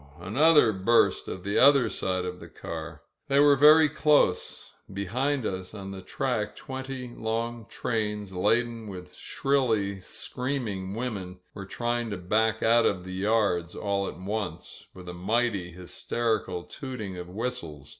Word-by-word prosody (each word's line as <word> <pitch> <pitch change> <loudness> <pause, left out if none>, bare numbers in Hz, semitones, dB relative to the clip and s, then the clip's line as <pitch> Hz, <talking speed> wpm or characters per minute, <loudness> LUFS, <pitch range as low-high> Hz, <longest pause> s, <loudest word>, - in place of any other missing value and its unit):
Another 125 - +4
burst 100 +5 +2
on 90 - -6
the 100 +2 +1
other 140 -2 +6
side 95 -1 -2
of 90 0 -5
the - - -10
car. - - -7 0.2
They 140 0 +3
were 145 0 +7
very 155 +3 +7
close. 150 -9 +1 0.2
Behind 125 +8 -1
us 95 +1 -4
on 100 -1 -7
the 95 -1 -7
track 110 +2 -2
twenty 130 -1 -6
long 115 0 -3
trains, 105 -4 -2
laden 115 +4 +1
with 90 -2 -9
shrilly 110 -8 0
screaming 105 -4 -4
women, 100 -7 -4 0.2
were 100 -2 -8
trying 120 +1 -2
to 100 - -4
back 110 +5 +1
out 115 +1 +5
of 90 -3 -1
the 95 0 -7
yards 95 -4 +1
all 100 -1 -1
at - - -6
once, 95 -3 -5
with 90 -1 -11
a 90 - -5
mighty 100 0 0
hysterical 90 +2 -2
tooting 115 -8 -6
of 90 0 -7
whistles. 95 - -5
110 Hz, 145 wpm, -27 LUFS, 95-125 Hz, 0.2 s, were